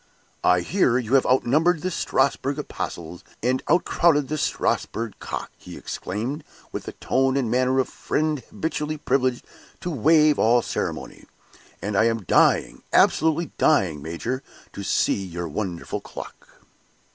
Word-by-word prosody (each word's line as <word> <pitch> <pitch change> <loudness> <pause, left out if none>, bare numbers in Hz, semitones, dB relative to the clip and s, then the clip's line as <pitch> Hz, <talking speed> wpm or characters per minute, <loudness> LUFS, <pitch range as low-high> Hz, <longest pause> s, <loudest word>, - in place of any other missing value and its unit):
"I 90 0 +4
hear 125 - +2
you 125 -1 -2
have 135 - +4
outnumbered 150 +6 +3
the 185 - -1
Strasbourg 140 -3 0
apostles, 85 - -6 0.2
and 130 +2 +1
outcrowed 160 -3 +3
the 155 - -1
Strasbourg 115 -5 -1
cock," - - -5
he - - -10
exclaimed, 120 - -4 0.3
with - - -5
the - - -6
tone 135 +1 +1
and 125 -5 0
manner 130 +1 +2
of 130 - +2
a - - -16
friend 155 -1 -1
habitually 155 -1 -3
privileged 130 -3 0 0.4
to 175 -1 -3
waive 150 +2 +4
all 120 +1 +4
ceremony; - - -4 0.6
"and 105 +1 -2
I 110 - +4
am 115 -2 0
dying, - - +3
absolutely 160 +2 +3
dying, 90 - +3
major, 85 - -4 0.3
to - - -6
see 100 - +1
your 85 -2 -5
wonderful 85 +1 -4
clock!" - - -10
130 Hz, 145 wpm, -24 LUFS, 110-150 Hz, 0.6 s, I